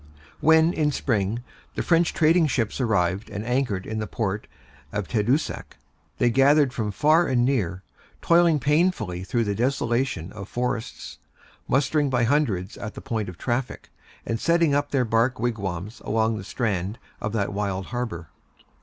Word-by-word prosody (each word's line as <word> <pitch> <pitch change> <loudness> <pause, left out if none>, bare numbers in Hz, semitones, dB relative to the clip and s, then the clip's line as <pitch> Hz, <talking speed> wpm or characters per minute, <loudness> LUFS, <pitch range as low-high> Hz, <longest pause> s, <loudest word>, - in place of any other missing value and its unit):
When, 160 +2 +5
in 150 -2 +1
spring, 115 -3 -1 0.3
the - - -1
French 170 -1 +3
trading 165 +1 +4
ships 120 -2 -1
arrived 100 -4 0
and 105 +1 -5
anchored 120 -6 -1
in 110 0 -4
the 110 - -3
port 105 -2 -3 0.4
of 105 -3 -3
Tadoussac, 125 +7 -1 0.4
they 120 - +3
gathered 135 +1 +4
from 110 -6 -2
far 155 - +3
and 120 -2 +2
near, 100 -9 -1 0.4
toiling 170 -2 +4
painfully 140 - +1
through 115 +4 0
the 100 -2 -1
desolation 120 -5 -1
of 95 +1 -9
forests, 120 -2 -4 0.5
mustering 145 +2 +2
by 125 -2 +1
hundreds 115 -8 0
at 110 -2 -6
the - - -7
point 110 -7 -3
of 90 - -10
traffic, 125 - -3 0.3
and 115 - -2
setting 170 -1 +3
up 145 0 +1
their 130 -3 +1
bark 115 +3 +1
wigwams 105 -4 -3
along 110 +1 +1
the 105 - -6
strand 100 -1 -2 0.2
of 110 - -2
that 100 -2 -1
wild 100 -2 -2
harbor. 110 -10 -4
120 Hz, 155 wpm, -24 LUFS, 105-140 Hz, 0.5 s, When